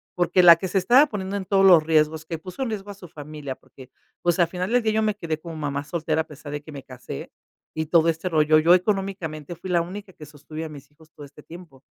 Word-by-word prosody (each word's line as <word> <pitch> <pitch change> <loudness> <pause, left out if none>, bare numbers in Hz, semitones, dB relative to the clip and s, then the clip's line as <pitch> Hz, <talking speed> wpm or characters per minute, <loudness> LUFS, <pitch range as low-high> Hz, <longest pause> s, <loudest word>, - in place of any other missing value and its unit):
Porque 180 +1 +2
la 170 -1 +10
que 190 - -4
se 190 - -1
estaba 240 +10 +5
poniendo 200 -3 -5
en 190 - -5
todos 195 0 +3
los 175 -4 +8
riesgos, 155 0 +1
que 165 0 -5
puso 185 - -9
en 250 - -3
riesgo 205 -2 -5
a - - -7
su 190 -3 -13
familia, 150 -3 -8
porque, 130 -1 -17 0.3
pues, 175 0 +1
al 175 - +4
final 180 +2 -4
del 245 -1 +2
día 220 - +1
yo 220 - +1
me 215 -1 0
quedé 165 -5 -4
como 165 0 -9
mamá 145 -2 -3
soltera 160 -1 -1
a - - -8
pesar 150 -1 -11
de 145 0 -5
que 150 0 -12
me 140 - -9
casé 125 - -9 0.4
y 160 0 -3
todo 165 +1 +3
este 165 +3 -2
rollo. 155 -2 +3
Yo, 170 +3 +5
económicamente, 180 -5 -3
fui 185 +3 -9
la 175 - +2
única 190 +3 -8
que 155 - -13
sostuve 155 +2 -9
a 160 - -7
mis 145 -1 -13
hijos 155 +1 -22
todo 145 - -12
este 145 +1 -16
tiempo. 160 -5 -14
165 Hz, 260 wpm, -23 LUFS, 150-185 Hz, 0.4 s, la